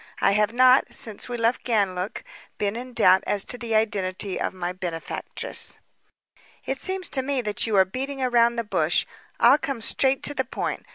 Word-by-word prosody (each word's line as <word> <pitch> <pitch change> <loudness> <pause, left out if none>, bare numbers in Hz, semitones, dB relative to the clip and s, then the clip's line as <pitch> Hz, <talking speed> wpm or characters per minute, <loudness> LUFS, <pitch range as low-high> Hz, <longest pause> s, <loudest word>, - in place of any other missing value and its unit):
I - - +3
have 210 +2 +2
not, 255 +2 +4
since 220 +1 -1
we 240 - -3
left 230 +1 0
Ganlook, 200 -3 -1 0.3
been 205 0 -1
in 250 +2 -7
doubt 190 -5 +4
as 200 -2 +1
to 245 - +1
the 230 -2 -2
identity 195 -3 -1
of - - -1
my 180 -1 -4
benefactress." 175 -3 -2 0.9
"It 270 0 -3
seems 375 -2 -3
to 265 - 0
me 275 0 -2
that 210 +1 -1
you 220 - 0
are 190 -1 +5
beating 270 +8 -5
around 235 -2 +2
the 235 - -2
bush. 210 - +1 0.3
I'll - - +6
come 275 -4 -4
straight 265 +4 +1
to 290 - 0
the - - -1
point. - - -5
225 Hz, 185 wpm, -24 LUFS, 200-255 Hz, 0.9 s, I'll